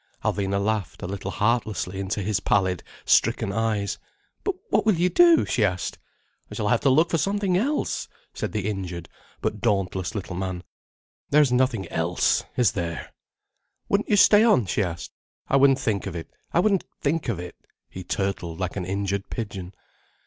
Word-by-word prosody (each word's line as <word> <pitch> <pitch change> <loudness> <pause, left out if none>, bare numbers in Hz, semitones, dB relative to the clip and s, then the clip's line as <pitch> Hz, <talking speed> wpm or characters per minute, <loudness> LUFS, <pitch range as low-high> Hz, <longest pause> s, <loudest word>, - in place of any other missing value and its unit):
Alvina 100 0 0
laughed, 105 -3 -2
a - - -3
little 100 +1 -5
heartlessly, 105 -3 -1
into 100 +1 -2
his 105 0 0
pallid, 95 -3 +1 0.2
stricken 100 - +3
eyes. 110 -2 -1 0.4
"But 395 - -1 0.2
what - - +3
will 215 -3 +3
you 175 +2 +2
do?" 340 - +6
she 115 - +1
asked. 90 -3 -1 0.5
"I - - -6
shall 105 - -1
have 120 - +3
to 140 - +2
look 160 +6 +4
for 165 - +2
something 200 +1 0
else," 275 +11 0 0.3
said - - -4
the 105 -2 -2
injured 90 -5 -4 0.3
but 105 - -2
dauntless 95 -4 0
little 95 -3 -4
man. 95 -1 -4 0.7
"There's 145 -2 +4
nothing 125 -5 +1
else, 85 +2 +1
is 125 -5 +4
there?" 85 -3 -4 0.8
"Wouldn't 200 +1 +1
you 210 - +4
stay 210 +2 +7
on?" 210 - +4
she 90 - 0
asked. 85 -3 -4 0.4
"I 135 - +3
wouldn't 135 -1 +5
think 105 -6 -1
of 90 - -5
it. 80 - -7 0.2
I 170 - +3
wouldn't 200 -2 +2 0.2
think 155 -1 -1
of 110 - -1
it." 90 0 -7 0.3
He 95 - -8
turtled 90 -3 -2
like 95 -1 -3
an 95 -3 -3
injured 100 +1 -2
pigeon. 100 -5 -5
105 Hz, 175 wpm, -25 LUFS, 95-135 Hz, 0.8 s, stay